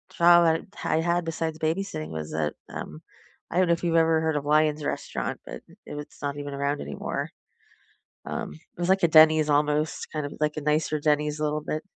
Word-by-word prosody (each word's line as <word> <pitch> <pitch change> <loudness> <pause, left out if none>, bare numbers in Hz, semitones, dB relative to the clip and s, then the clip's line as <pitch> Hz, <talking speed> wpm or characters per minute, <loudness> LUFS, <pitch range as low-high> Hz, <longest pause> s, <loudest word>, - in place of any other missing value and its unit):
job 170 -2 +5 0.2
I - - +1
I - - +2
had 170 +1 0
besides 160 -1 -3
babysitting 160 0 -2
was 80 -1 -5
that, 75 -1 -1 0.2
um, 75 +1 -7 0.5
I - - -3
don't 185 -1 +4
know 170 - +4
if 170 - -4
you've 170 -1 +1
ever 160 -1 +4
heard 160 -1 0
of 145 - -2
Lyons 150 0 +2
Restaurant, - - -3
but - - -8 0.3
it - - -7
was 150 - -5 0.2
not 145 0 -3
even 145 -1 -5
around 140 +1 -1
anymore. 70 -1 -4 0.9
Um, - - -4
it 80 - -20
was 175 +1 -1
like 190 -1 +3
a - - +7
Denny's 155 -1 +6
almost, 150 +1 0
kind 155 -2 -3
of 145 - -6
like 150 0 0
a - - -2
nicer 150 +1 0
Denny's 150 0 +1
a - - -2
little 150 0 0
bit 155 +1 -4
155 Hz, 210 wpm, -26 LUFS, 145-165 Hz, 0.9 s, a